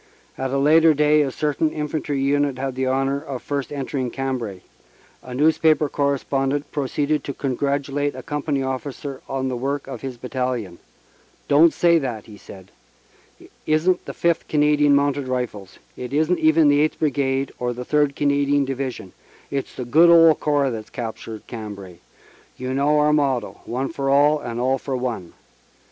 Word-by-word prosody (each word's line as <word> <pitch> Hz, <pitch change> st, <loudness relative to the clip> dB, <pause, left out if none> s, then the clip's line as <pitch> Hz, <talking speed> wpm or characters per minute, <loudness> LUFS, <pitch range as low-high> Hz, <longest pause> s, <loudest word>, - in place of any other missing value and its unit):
At 135 Hz, -, -3 dB
a 135 Hz, -, -1 dB
later 155 Hz, +3 st, +5 dB
day 150 Hz, +1 st, +4 dB
a 140 Hz, -, 0 dB
certain 150 Hz, +2 st, 0 dB
infantry 150 Hz, -1 st, -3 dB
unit 140 Hz, 0 st, +1 dB
had 135 Hz, 0 st, -3 dB
the 130 Hz, +1 st, -2 dB
honor 135 Hz, +2 st, 0 dB
of 135 Hz, -5 st, -6 dB
first 140 Hz, -1 st, -3 dB
entering 135 Hz, -2 st, -3 dB
Cambrai. 125 Hz, -8 st, -4 dB, 0.6 s
A 125 Hz, -1 st, -8 dB
newspaper 155 Hz, +1 st, +3 dB
correspondent 140 Hz, 0 st, -1 dB
proceeded 145 Hz, +1 st, -1 dB
to 140 Hz, -, -5 dB
congratulate 140 Hz, +1 st, -1 dB
a 130 Hz, -, -8 dB
com 150 Hz, -2 st, -3 dB
pany 140 Hz, -3 st, -1 dB
officer 135 Hz, +1 st, -5 dB
on 135 Hz, -1 st, -2 dB
the 130 Hz, -, -2 dB
work 135 Hz, +3 st, -3 dB
of 135 Hz, -, -8 dB
his 130 Hz, -2 st, -6 dB
battalion. 125 Hz, -7 st, -3 dB, 0.7 s
"Don 145 Hz, +3 st, +6 dB
t -, -, -1 dB
say 170 Hz, -1 st, +4 dB
that," 120 Hz, -7 st, -4 dB
he 105 Hz, -, -12 dB
said. 95 Hz, -1 st, -13 dB, 0.7 s
"It -, -, -17 dB, 0.2 s
isn 155 Hz, +4 st, +3 dB
t 180 Hz, -, -14 dB
the -, -, -6 dB
Fifth 170 Hz, -1 st, 0 dB
Canadian 150 Hz, -1 st, +3 dB
Mounted 140 Hz, -1 st, +1 dB
Rifles; 125 Hz, -7 st, -4 dB, 0.2 s
it 125 Hz, +1 st, -7 dB
isn 160 Hz, +4 st, +2 dB
t -, -, -9 dB
even 155 Hz, 0 st, +5 dB
the 145 Hz, 0 st, +4 dB
Eighth 155 Hz, -, 0 dB
Brigade 135 Hz, -2 st, 0 dB
or 125 Hz, 0 st, -1 dB
the 125 Hz, +1 st, -6 dB
Third 145 Hz, -1 st, +1 dB
Canadian 140 Hz, 0 st, +2 dB
Division 130 Hz, -7 st, -5 dB, 0.4 s
it 140 Hz, -1 st, -1 dB
s -, -, -18 dB
the 125 Hz, -, -5 dB
good 160 Hz, +8 st, +5 dB
old 165 Hz, -2 st, +7 dB
Corps 145 Hz, -3 st, +1 dB
that 110 Hz, -2 st, -5 dB
s -, -, -23 dB
captured 115 Hz, -2 st, -7 dB
Cambrai; 100 Hz, -6 st, -8 dB, 0.6 s
you 130 Hz, +1 st, -4 dB
know 145 Hz, +3 st, +2 dB
our 150 Hz, 0 st, +3 dB
motto, 140 Hz, -5 st, 0 dB
One 130 Hz, +3 st, -3 dB
for 140 Hz, -4 st, -3 dB
all 145 Hz, +2 st, +4 dB
and 120 Hz, -3 st, -5 dB
all 130 Hz, +2 st, +1 dB
for 135 Hz, 0 st, -3 dB
one. 120 Hz, -9 st, -4 dB
140 Hz, 180 wpm, -22 LUFS, 130-150 Hz, 0.7 s, old